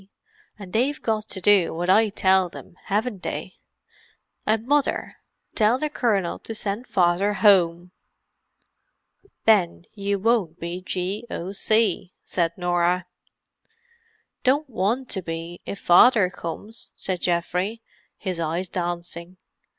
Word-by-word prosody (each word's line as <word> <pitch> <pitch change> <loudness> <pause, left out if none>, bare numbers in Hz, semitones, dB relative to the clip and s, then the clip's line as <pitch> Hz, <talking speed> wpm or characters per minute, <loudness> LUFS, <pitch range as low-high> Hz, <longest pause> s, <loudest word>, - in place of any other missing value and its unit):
and 195 -3 -11
they've 265 +6 +1
got 220 -1 -2
to 190 - -5
do 190 -3 +4
what 175 +2 -2
I 215 +4 +5
tell 190 -2 +3
them, 170 - -12
haven't 210 0 -1
they? - - -5 0.9
And 220 +1 +1
Mother—tell 250 -4 0
the 300 +2 -2
Colonel 200 - 0
to 225 - -7
send 210 +4 -3
Father 185 +2 +2
home." 180 -4 +3 1.5
"Then 185 -6 +3
you 200 -1 -1
won't 195 -6 +1
be 170 +2 -5
G.O.C.," 195 +1 -1
said 170 -2 -1
Norah. 175 0 +1 1.4
"Don't 285 +4 +2
want 235 +3 -1
to 190 - -1
be, 165 0 -6
if 200 - -4
Father 190 +1 +6
comes," 205 +7 -7
said 185 -2 -3
Geoffrey, 180 +6 -1 0.3
his 185 -4 -4
eyes 170 +3 -2
dancing. 175 0 -4
190 Hz, 115 wpm, -24 LUFS, 175-220 Hz, 1.5 s, Father